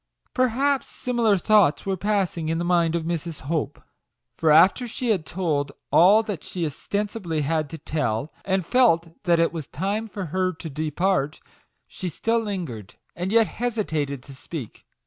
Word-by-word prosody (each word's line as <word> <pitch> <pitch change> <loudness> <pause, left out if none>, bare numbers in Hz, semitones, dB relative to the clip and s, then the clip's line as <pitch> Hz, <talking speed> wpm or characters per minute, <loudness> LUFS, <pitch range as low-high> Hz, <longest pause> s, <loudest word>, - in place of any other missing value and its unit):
Perhaps 265 +1 +1
similar 235 -5 +1
thoughts 200 -5 +3
were 195 -1 0
passing 190 -5 -1
in 165 - 0
the 170 - -2
mind 170 -2 +2
of 170 - -1
Mrs. 165 -1 -4
Hope; 150 -1 -2 0.6
for 160 - +1
after 185 +11 +5
she 240 +1 -3
had 185 -8 +1
told 150 -6 -1 0.2
all 205 +6 +6 0.2
she 175 -3 -4
ostensibly 185 - -3
had 155 0 0
to 165 - -7
tell, 150 -4 -2
and 190 -2 0
felt 170 -9 +2
that 170 -1 +4
it 165 - +2
was 160 -4 -5
time 200 - -2
for 200 -2 -5
her 185 0 +1
to 160 -1 -8
depart, 155 +1 0 0.5
she 185 - -5
still 225 +8 0
lingered, 170 - -5 0.2
and 180 +3 -3
yet 225 0 +5
hesitated 160 - -2
to 140 - -12
speak. 135 -2 -8
175 Hz, 160 wpm, -24 LUFS, 155-205 Hz, 0.6 s, all